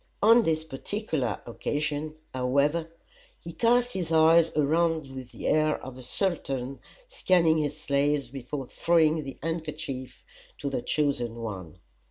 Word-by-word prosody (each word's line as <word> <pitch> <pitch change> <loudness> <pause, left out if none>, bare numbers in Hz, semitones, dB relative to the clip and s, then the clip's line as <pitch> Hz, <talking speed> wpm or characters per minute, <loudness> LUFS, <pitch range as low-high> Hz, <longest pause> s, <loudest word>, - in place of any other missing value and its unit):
On 230 +3 +7
this 160 -5 0
particular 155 - -3
occasion, 150 +5 -3 0.2
however, 140 +6 +1 0.5
he 170 - -9
cast 245 +3 +2
his 175 -4 -3
eyes 160 +1 +6
around 155 -1 +1
with 130 -2 -7
the - - -9
air 155 0 +2
of 130 -1 -8
a 130 - -10
sultan 135 -3 -2 0.3
scanning 175 - +3
his 150 0 -2
slaves 140 -1 +1
before 135 +2 -6
throwing 160 +2 +2
the 135 -1 -8
handkerchief 155 -6 -5 0.3
to 140 -1 -3
the 130 - -1
chosen 135 -7 0
one. 100 -8 -6
150 Hz, 135 wpm, -27 LUFS, 135-165 Hz, 0.5 s, On